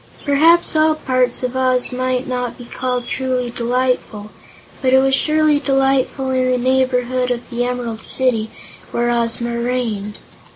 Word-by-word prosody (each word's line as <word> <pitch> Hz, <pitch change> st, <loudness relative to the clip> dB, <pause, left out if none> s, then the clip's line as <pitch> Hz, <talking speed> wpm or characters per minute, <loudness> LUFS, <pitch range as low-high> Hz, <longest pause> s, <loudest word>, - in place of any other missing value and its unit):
Perhaps 320 Hz, +4 st, +4 dB
all 310 Hz, 0 st, +3 dB
parts 255 Hz, -4 st, 0 dB
of 250 Hz, 0 st, -2 dB
Oz 255 Hz, -1 st, +1 dB
might 255 Hz, +1 st, -2 dB
not 250 Hz, -1 st, -3 dB
be 245 Hz, -, -10 dB
called 250 Hz, 0 st, -3 dB
truly 255 Hz, -2 st, -2 dB
delightful, 240 Hz, -3 st, -2 dB, 0.5 s
but 260 Hz, -2 st, +2 dB
it -, -, +7 dB
was 270 Hz, 0 st, +3 dB
surely 305 Hz, +1 st, +3 dB
delightful 270 Hz, -1 st, +1 dB
in 255 Hz, 0 st, +1 dB
the 255 Hz, -, +2 dB
neighborhood 255 Hz, 0 st, +1 dB
of 240 Hz, -1 st, -3 dB
the 240 Hz, 0 st, -1 dB
Emerald 240 Hz, -3 st, -4 dB
City, 235 Hz, -4 st, +1 dB, 0.4 s
where 240 Hz, 0 st, 0 dB
Ozma 235 Hz, 0 st, -1 dB
reigned. 230 Hz, -4 st, -2 dB
255 Hz, 150 wpm, -18 LUFS, 240-265 Hz, 0.5 s, it